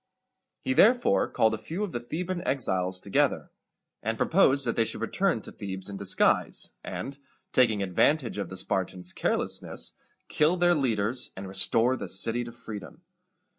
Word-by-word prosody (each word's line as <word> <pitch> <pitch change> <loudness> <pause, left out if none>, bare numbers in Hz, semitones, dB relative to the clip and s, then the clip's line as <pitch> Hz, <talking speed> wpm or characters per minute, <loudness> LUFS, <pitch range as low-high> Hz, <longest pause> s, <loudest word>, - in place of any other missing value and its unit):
He 130 - 0
therefore 240 - +4
called 110 0 +2
a 110 - -3
few 170 - -4
of 205 - -3
the 120 - -3
Theban 175 +9 -4
exiles 95 - +1
together, 100 +1 0 0.5
and 110 +1 -2
proposed 140 -6 +3
that 115 - -1
they 115 - +3
should - - -4
return - - 0
to - - -9
Thebes 95 -1 -6
in 100 - -6
disguise, 100 -1 +2
and, 140 +1 -6 0.3
taking 110 -6 +3
advantage 115 - +1
of 95 -4 -4
the 95 - -7
Spartans' 90 -1 -2
carelessness, - - -3 0.3
kill 155 +4 +2
their 175 0 +4
leaders, 120 -5 0
and 95 0 -6
restore 115 +6 +2
the - - -6
city 115 +5 +1
to 120 - -8
freedom. 115 - -10
115 Hz, 160 wpm, -27 LUFS, 100-150 Hz, 0.5 s, therefore